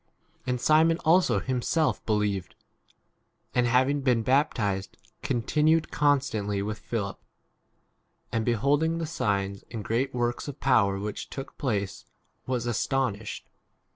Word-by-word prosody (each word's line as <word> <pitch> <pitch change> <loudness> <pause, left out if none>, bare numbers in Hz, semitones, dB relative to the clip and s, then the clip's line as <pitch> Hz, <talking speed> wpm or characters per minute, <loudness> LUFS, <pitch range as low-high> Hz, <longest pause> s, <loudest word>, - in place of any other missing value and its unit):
And 125 -1 0
Simon 160 +4 +4
also 175 +3 +4
himself 130 +5 0
believed; 105 -4 0 1.0
and, 125 0 +2
having 130 +4 +2
been 125 -4 +2
bap 135 +6 +2
tized, 100 -4 -1 0.3
continued 155 +6 +1
constantly 130 -9 +1
with 105 +1 -4
Philip; 100 -4 -4 1.1
and, 115 -1 0
beholding 140 +8 +2
v - - -2
the - - -1
signs 100 -9 -1
and 110 -3 -6
great 130 +4 0
works 120 +2 -1
of 145 - -7
power 100 -2 +3
which 105 +1 -4
14 - - -30
took 135 0 -8
place, 100 -8 -2 0.4
was 125 -2 -1
astonished. 120 -2 -2
120 Hz, 130 wpm, -27 LUFS, 105-140 Hz, 1.1 s, Simon